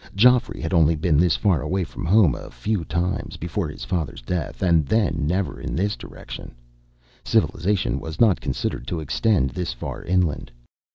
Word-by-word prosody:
Geoffrey 125 +4 +4
had 80 +4 -3
only 80 -1 +4
been 80 0 +1
this 85 -1 +4
far 95 -9 +2
away 90 +6 -1
from 95 +2 -6
his 85 - -1
home 95 - +6
a - - -8
few 105 -5 -2
times, 85 +4 -2
before 85 +2 -2
his 75 - -8
father's 70 -3 -3
death, 85 +5 -3
and 85 -3 +4
then 85 -8 +1
never 90 +3 -1
in - - -4
this 100 +5 0
direction. - - -10 0.7
Civilization 95 +3 +1
was 80 -1 -7
not 110 -7 +4
considered 60 - -3
to 85 - -2
extend 80 - +1
this 90 -6 -3
far - - -6
inland. 85 -8 0
85 Hz, 175 wpm, -23 LUFS, 80-95 Hz, 0.7 s, home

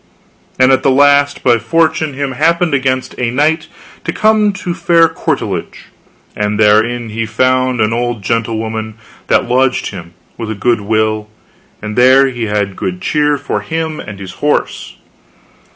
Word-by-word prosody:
And 130 0 +4
at 130 0 +3
the 135 - +2
last 145 +1 +3
by 120 -2 +3
fortune 155 +3 0
him 140 0 -2
happened 165 +4 +1
against 130 -1 -1
a 125 -1 0
night 155 +5 0 0.4
to - - -2
come 215 -1 +2
to 185 -2 -5
a - - -1
fair 170 -1 +3
courtilage, 140 - -4 0.5
and 105 0 -2
therein 110 +3 +2
he 110 +1 -3
found 130 +2 +1
an 110 0 +1
old 120 -2 -2
gentle 115 +2 -1
woman 110 -1 -4 0.3
that - - +2
lodged 130 +1 +1
him 90 -3 -10 0.2
with 115 -2 -4
a 110 - -3
good 115 +2 0
will, 110 0 -1 0.5
and 105 0 -5
there 130 +2 +5
he 120 -3 -3
had 105 -2 -2
good 180 - -4
cheer 150 -4 +1
for 145 - -3
him 160 -1 -4
and 105 -1 -8
his 95 -2 -8
horse. 150 0 -1
125 Hz, 165 wpm, -14 LUFS, 110-145 Hz, 0.5 s, there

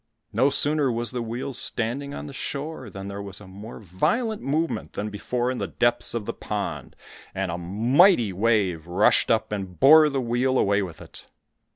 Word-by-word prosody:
No 135 - +3
sooner 145 -1 +2
was 120 0 -2
the 125 -1 -3
wheel 120 +4 -5
standing 125 +4 +1
on 145 - -7
the 145 - -9
shore 140 -1 -5
than 95 0 -8
there 100 0 -6
was 100 -1 -3
a 105 - -13
more 100 +4 -10
violent 210 - -1
movement 155 +4 -2
than 105 +1 -4
before 120 +4 -2
in 130 - -4
the - - -2
depths 120 0 0
of 115 -3 -3
the - - -4
pond, - - -5 0.4
and 95 -2 -2
a 85 - -4
mighty 115 - +3
wave 95 -5 0
rushed 90 +4 +3
up, 110 -2 +1
and 95 -4 -5
bore 155 +3 +7
the 140 -1 -2
wheel 125 +2 0
away 100 -2 +2
with 85 -5 -7
it. - - -12
115 Hz, 190 wpm, -24 LUFS, 100-135 Hz, 0.4 s, bore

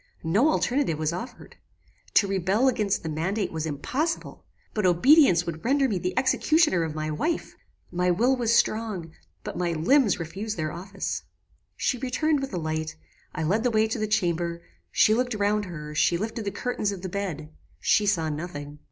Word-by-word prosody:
No 205 - +3
alternative 260 - +1
was 155 +1 -1
offered. 240 +7 -8 0.6
To 200 - +5
rebel 195 +6 +1
against 210 -6 +1
the - - -4
mandate 185 +7 -1
was 160 -1 -3
impossible; 260 - -3 0.3
but 210 - -1
obedience 180 - +5
would 165 -2 -5
render 275 +2 +3
me 200 -7 -1
the 180 +1 -3
executioner 285 - +3
of 160 -2 -3
my 155 0 -2
wife. 320 - -2 0.4
My 180 +1 +1
will 240 +9 +3
was 235 -3 0
strong, 215 -8 0 0.3
but - - -5
my 175 -1 0
limbs 205 - +3
refused 195 +6 -5
their 155 -1 -2
office. 190 +3 -4 0.6
"She 250 - 0
returned 280 +4 +1
with 270 0 -4
a 185 - -3
light; 155 -1 -3 0.4
I 160 - -2
led 195 +8 +1
the 250 - +3
way 220 -1 +2
to - - -2
the 215 - 0
chamber; 170 -5 0 0.3
she 215 - +4
looked 245 0 0
round 205 0 +1
her; 150 -4 -7
she 170 +3 +2
lifted 220 +3 -4
the - - 0
curtain 210 0 -2
of 195 -2 -7
the - - -2
bed; 175 -6 -4 0.3
she 210 - +2
saw 170 -6 +2
nothing. 150 -2 -6
195 Hz, 180 wpm, -26 LUFS, 165-230 Hz, 0.6 s, To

